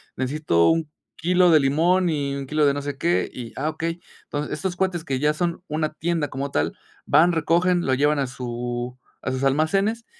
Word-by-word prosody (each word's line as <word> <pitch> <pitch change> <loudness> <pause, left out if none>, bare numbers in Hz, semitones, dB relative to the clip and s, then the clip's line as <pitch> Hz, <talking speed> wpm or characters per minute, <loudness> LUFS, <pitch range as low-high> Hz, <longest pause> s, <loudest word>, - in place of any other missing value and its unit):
necesito 130 - +2
1 160 -2 0 0.2
kilo 180 +1 +3
de 155 - +7
limón, 170 +6 +2
y 140 -3 -1
1 140 -1 -5
kilo 150 +1 +2
de 140 - +4
no 145 - -3
sé 145 -1 -5
qué, 170 +4 +1
y, 120 -3 -8
ah, 150 +3 -1
okey". 165 +2 -4 0.2
Entonces, 145 0 -4
estos 180 +4 -3
cuates 180 -3 -1
que 135 -4 -1
ya 150 +2 +2
son 170 +2 -2
una 155 0 -2
tienda 160 -2 -1
como 135 +2 -4
tal, 75 - 0 0.3
van, 160 +5 +5
recogen, 170 +2 +2
lo 130 - +2
llevan 145 +2 +2
a 135 - 0
su 120 0 -5 0.2
a - - -2
sus 130 +1 -3
almacenes, 195 - +1
150 Hz, 200 wpm, -23 LUFS, 135-170 Hz, 0.3 s, de